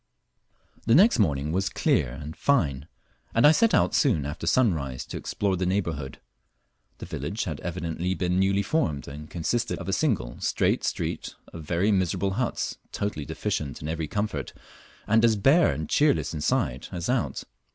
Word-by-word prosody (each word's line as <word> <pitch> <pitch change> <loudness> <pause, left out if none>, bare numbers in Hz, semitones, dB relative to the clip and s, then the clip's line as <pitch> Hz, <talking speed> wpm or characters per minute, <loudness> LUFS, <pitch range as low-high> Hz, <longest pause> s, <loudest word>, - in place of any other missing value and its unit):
The 115 - +5
next 200 - +6
morning 75 -6 +1
was 95 +3 0
clear - - +1
and 75 +4 -8
fine, 75 - +1 0.5
and 115 - +5
I 150 - +9
set 230 +7 +3
out - - +2
soon 100 - +2
after 75 +3 -5
sunrise 80 - +1
to - - -8
explore 100 -2 -1
the 90 0 -1
neighbourhood. 85 -8 -2 0.8
The - - -8
village 80 - -4
had 80 -6 -4
evidently 85 +1 -3
been 90 +2 0
newly 100 +1 +2
formed, 100 - -1
and 75 +2 -9
consisted 90 +8 -1
of 95 - -8
a 95 - -1
single 100 - 0
straight - - +1
street - - -3 0.2
of 80 -2 -8
very 90 +7 +1
miserable 95 0 +1
huts 120 +5 -2
totally 100 -8 -3
deficient 70 -2 -3
in - - -4
every 80 0 -2
comfort, 100 - -3 0.5
and 110 +2 +3
as 115 -2 +5
bare 140 - +4
and 80 0 -4
cheerless 145 - +2
inside 75 -4 -1
as 90 -2 -4
out. 125 -2 -1
90 Hz, 165 wpm, -26 LUFS, 75-110 Hz, 0.8 s, I